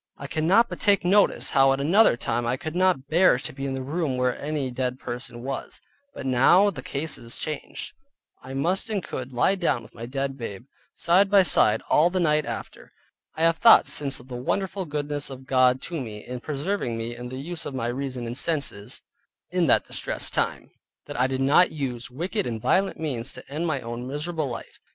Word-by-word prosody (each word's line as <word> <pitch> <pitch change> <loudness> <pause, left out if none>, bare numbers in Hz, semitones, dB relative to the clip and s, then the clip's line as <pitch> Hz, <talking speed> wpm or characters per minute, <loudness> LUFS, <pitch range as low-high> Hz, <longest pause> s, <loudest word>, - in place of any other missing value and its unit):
I - - -8
cannot 180 +9 +3
but - - -7
take 200 -3 +3
notice 200 +3 +3
how 135 0 +5
at 135 - -2
another 170 - +4
time 120 0 -1
I 125 +2 0
could 160 +1 -6
not 180 -7 +2
bear 170 -2 +4
to 125 - -4
be 135 +1 -4
in 135 - -3
the 130 - -4
room 145 -1 -2
where 125 -1 +1
any 145 -3 -2
dead 125 0 -2
person 120 -1 -6
was, 135 +1 -5 0.4
but - - -7
now 135 +11 +5
the 135 - -8
case 140 +3 -3
is 115 0 -1
changed; 155 -2 -5 0.5
I 130 +1 -8
must 175 +10 0
and 205 -4 -1
could 130 0 -6
lie 125 +9 +2
down 170 -10 0
by - - -14
my 115 - -7
dead 135 +1 -3
babe, 115 0 -6 0.3
side 185 +4 +3
by 200 -1 +6
side 110 -9 +3
all 160 +3 +4
the 185 +1 -1
night 150 -3 +2
after. - - -7 0.4
I 160 - -2
have 165 0 +4
thought 230 - +7
since 140 -2 +2
of 120 - -15
the 125 -2 -6
wonderful 190 +6 -2
goodness 145 -1 -3
of 130 -1 -9
God 130 -1 +3
to 165 -4 -4
me 105 -4 -8
in 125 0 -6
preserving 145 - -2
me 115 +1 -4
in 125 +1 -7
the 130 - -6
use 160 +5 -5
of 140 - -6
my 120 -3 -2
reason 125 0 -3
and 115 +1 -5
senses 140 -9 -1 0.5
in - - +1
that - - +4
distressed - - -3
time, - - -1 0.3
that - - -6
I 130 - +3
did 130 0 -2
not 145 +7 +5
use 125 -6 -4
wicked 180 - -3
and 115 -2 -3
violent 190 - +1
means 135 -6 -3
to - - -12
end 155 +5 -3
my 145 -5 -1
own 120 +1 -6
miserable 150 +1 -3
life. 120 - -8
135 Hz, 210 wpm, -25 LUFS, 125-165 Hz, 0.5 s, thought